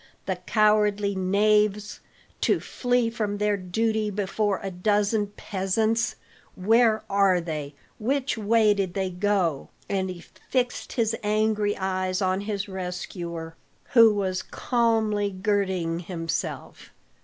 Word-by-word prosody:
"The - - -2
cowardly 210 -2 +3
knaves! 210 +2 +1 0.4
to - - +2
flee 245 -2 0
from 210 -3 -2
their 210 0 +1
duty 215 +3 -1
before 205 0 -1
a 195 - -3
dozen 205 +3 +1
peasants, 215 +3 -1 0.4
where 220 +3 +3
are 195 -2 +3
they? 150 -4 -5 0.2
Which 270 +4 0
way 220 0 +3
did 195 -3 -2
they 190 -1 -1
go?" 180 -5 0 0.2
And 190 -1 -1
he 180 -2 -7 0.3
fixed 250 -1 -1
his 225 -3 +1
angry 210 0 +1
eyes 185 -1 -1
on 190 0 0
his 205 -1 -3
rescuer, 180 -3 -5 0.4
who 230 -2 +8
was 185 -2 -1
calmly 220 -4 0
girding 190 -4 -1
himself. 165 -2 -5
205 Hz, 120 wpm, -25 LUFS, 185-215 Hz, 0.4 s, who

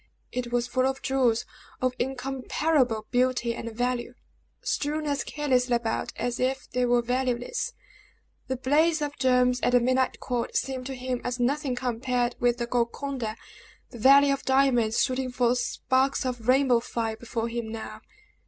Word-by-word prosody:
It 245 -1 -4
was 240 0 +1
full 255 +1 +1
of 270 0 -3
jewels 255 -4 +2 0.3
of 255 0 +1
incomparable 265 -1 0
beauty 245 -1 +1
and 230 0 -6
value, 245 +1 -2 0.5
strewn 300 +1 -1
as 285 -1 -1
carelessly 255 -4 +1
about 235 -1 -2
as 240 +1 -2
if 260 +1 -1
they 250 0 +1
were 240 0 +3
valueless. 250 - -1 0.7
The 260 - -1
blaze 300 +5 +2
of 290 0 -3
gems 250 -1 +3
at 245 - +1
the 245 - +7
midnight 255 +2 +1
court 245 -2 -2
seemed 260 -1 -3
to 270 - -5
him 250 -1 -3
as 245 0 -3
nothing 270 +1 0
compared 245 0 -1
with 240 0 +2
the 240 - -2
Golconda, 240 -1 -2 0.6
the 240 - -10
Valley 275 +4 +7
of 275 0 -1
Diamonds 260 -4 +3
shooting 255 -1 -1
forth 245 0 +2
sparks 260 +2 0
of 245 -3 -4
rainbow 255 -2 +4
fire 230 -1 -3
before 230 0 -3
him 235 -1 -4
now. 225 -1 -7
250 Hz, 160 wpm, -27 LUFS, 240-265 Hz, 0.7 s, the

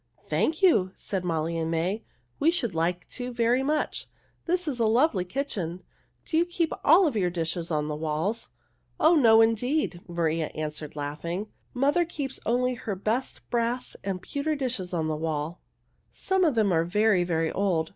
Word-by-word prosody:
"Thank 315 +4 0
you!" 190 - +4
said 190 -3 -4
Molly 165 -1 -1
and 160 0 -1
May. 175 +6 -1 0.4
"We 315 - +4
should 245 - 0
like 175 +2 -1
to 250 0 -5
very 240 +1 +2
much. 300 +3 -1 0.4
This 360 0 0
is 265 -5 -2
a 225 - +3
lovely 225 - +3
kitchen. 185 - -3 0.4
Do 320 - 0
you 340 - +3
keep 345 -2 -1
all 345 +6 +7
of 290 -7 0
your 185 -4 +2
dishes 170 0 -3
on 150 -2 0
the 150 - -2
walls?" 160 +8 -2 0.5
"Oh, 320 +3 +6
no, 225 -6 +7
indeed!" 230 - +1
Maria 165 -2 0
answered, 150 -1 -5
laughing. 170 +7 -4 0.3
"Mother 285 +7 +3
keeps 285 -5 -4
only 250 +2 +2
her 220 -4 -4
best 220 +7 -2
brass 240 +1 -1
and 190 -2 -3
pewter 300 +2 -2
dishes 250 -10 -3
on 165 -3 -1
the 155 - -1
walls. 155 +1 -3 0.5
Some 380 -1 +1
of 300 -6 +2
them 215 -3 +3
are 165 -1 +3
very, 205 +1 +3
very 165 -2 0
old. 175 -5 0
205 Hz, 175 wpm, -27 LUFS, 165-265 Hz, 0.5 s, all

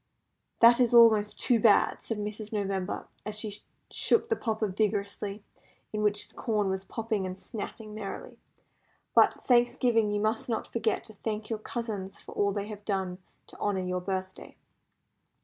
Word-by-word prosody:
"That 235 +1 +8
is 245 -1 +4
almost 220 -3 +6
too 240 -3 +3
bad," 210 -2 +4
said 225 - -4
Mrs. 210 +1 -5
November, 195 -3 -2 0.2
as 210 0 -4
she 210 -1 -4 0.3
shook 460 0 +2
the 450 - +3
popper 220 - -1
vigorously 200 0 -2 0.5
in 210 - -1
which 210 -1 0
the - - -21
corn 210 -5 0
was 190 0 -3
popping 220 -4 -2
and 185 +1 -7
snapping 215 0 -7
merrily; 210 -2 -7 0.7
"but, - - +4
Thanksgiving, 240 -3 +3
you 205 - 0
must 215 +3 -1
not 225 - -1
forget 230 - 0
to 220 - -13
thank 215 0 -3
your 220 - -1
cousins 210 -4 -5
for - - -12
all 200 0 +1
they 200 0 -3
have 210 -1 -8
done 190 -3 -2 0.3
to - - -13
honour 195 -2 0
your 180 0 -2
birthday." 190 0 -5
210 Hz, 165 wpm, -29 LUFS, 200-225 Hz, 0.7 s, That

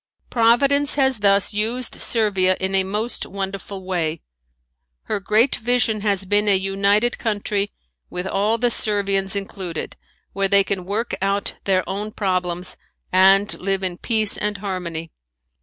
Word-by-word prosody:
Providence 275 +5 +3
has 265 -4 +3
thus 200 0 +3
used 230 +4 -1
Servia 195 -5 +2
in 190 0 -2
a 190 0 +3
most 210 +5 -2
wonderful 195 0 -6
way. 170 -4 -2 0.8
Her 210 - -1
great 215 +6 +2
vision 230 -2 +1
has 200 -2 0
been 205 +2 +1
a 200 - +5
united 200 +4 +1
country 205 -2 -2 0.4
with 180 +1 -4
all 205 +4 0
the 240 +1 +1
Servians 200 -3 +1
included, 190 -4 -5 0.4
where 195 0 0
they 200 0 +4
can 190 -2 -3
work 215 +5 -2
out 200 +1 -1
their 185 -2 +1
own 205 +2 -4
problems 180 -2 -1 0.3
and 195 +2 +5
live 195 0 -1
in 180 -2 -3
peace 220 -3 +1
and 210 0 -2
harmony. 180 -5 -5
200 Hz, 140 wpm, -21 LUFS, 190-215 Hz, 0.8 s, a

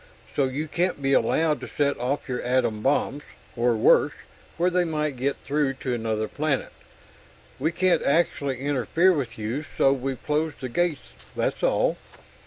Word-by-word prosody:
So 140 - +3
you 140 +4 -3
can't 175 +1 0
be 135 0 +1
allowed 150 +6 +2
to - - -6
set 140 -1 0
off 130 +4 -2
your 125 -2 -2
atom 125 -4 0
bombs, 140 +2 +1 0.3
or 120 0 +2
worse, - - +4 0.4
where 175 +2 +2
they 180 0 +2
might 150 -4 -1
get 135 +3 -1
through 145 -1 0
to 130 -1 -4
another 110 -2 -1
planet. 145 +1 -1 0.9
We 155 +5 +1
can't 185 +1 +2
actually 140 -4 +1
interfere 145 +6 +2
with 130 -8 -3
you, 115 +7 -3
so 135 - +5
we've 135 -1 -4
closed 155 +1 -1
the 130 - -5
gates; 170 0 -1 0.2
that's - - -1
all." - - +2
140 Hz, 165 wpm, -25 LUFS, 125-155 Hz, 0.9 s, so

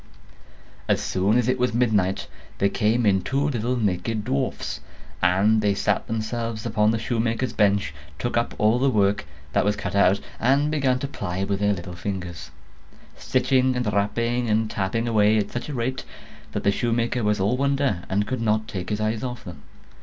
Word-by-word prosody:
As - - +2
soon 100 +5 +1
as 125 -1 +1
it 130 0 +1
was 125 -2 +1
midnight, 105 -6 +1 0.3
there 100 - +2
came 110 +4 +1
in 95 -2 +3
two 135 +9 0
little 120 -1 -1
naked 105 +1 -1
dwarfs; 70 - -2 0.4
and 100 +5 +3
they 100 -1 +2
sat 100 0 0
themselves 115 0 -3
upon 105 -2 +2
the 115 - +1
shoemaker's 115 +2 -1
bench, 100 -8 +2 0.2
took 120 - -2
up 115 0 0
all 110 +3 +3
the 135 +1 +3
work 100 -4 +1 0.3
that - - +3
was 105 0 +1
cut - - -4
out, 100 0 +4 0.2
and 140 +5 +2
began 135 -4 +2
to 140 - -3
ply 95 -8 -4
with 100 0 -1
their 100 0 +2
little 90 -1 -6
fingers, 85 -4 -5 0.7
stitching 130 -1 +1
and 120 -4 -1
rapping 115 +4 0
and 110 0 +1
tapping 105 +4 -1
away 110 -1 +4
at 105 -1 -1
such 120 +4 -4
a - - -4
rate, 130 +2 -2 0.5
that - - -2
the 100 - +4
shoemaker 120 +2 0
was 105 -1 +1
all 100 +6 +2
wonder, 140 -7 +1
and 100 +2 +1
could 130 +1 -3
not 110 -1 +1
take 90 -3 -5
his 105 - -1
eyes 110 +1 -1
off 125 -2 -5
them. 85 -7 -10
110 Hz, 185 wpm, -24 LUFS, 100-120 Hz, 0.7 s, out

